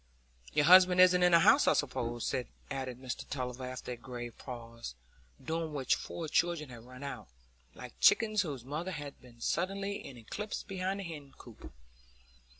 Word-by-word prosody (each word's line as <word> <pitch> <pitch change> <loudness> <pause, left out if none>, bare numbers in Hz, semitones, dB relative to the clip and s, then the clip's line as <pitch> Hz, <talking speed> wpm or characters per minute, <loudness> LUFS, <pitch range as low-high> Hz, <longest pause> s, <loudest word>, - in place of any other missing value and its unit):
"Your 145 - +3
husband 180 +1 +8
isn't 180 0 +7
in 180 0 +5
the 170 -1 +7
house, - - +6
I - - +6
suppose?" 120 -4 -1 0.4
added 130 -2 -4
Mr 130 -2 -6
Tulliver 125 -1 -4
after 130 0 -6
a - - -3
grave 120 -1 -7
pause, 115 - -8 0.5
during 160 -1 -2
which 135 -2 +2
four 165 -2 -4
children 165 -2 +1
had 120 -2 -11
run 125 +2 -10
out, 140 - -6 0.5
like - - -9
chickens 215 -2 +5
whose 140 -9 -5
mother 160 +7 -4
has 145 -2 -6
been 120 -2 -17
suddenly 195 +7 -1
in 130 - -9
eclipse 205 - -5
behind 190 0 -3
the - - -5
hen 150 -6 -8
coop. 120 -4 -12
145 Hz, 165 wpm, -32 LUFS, 125-180 Hz, 0.5 s, husband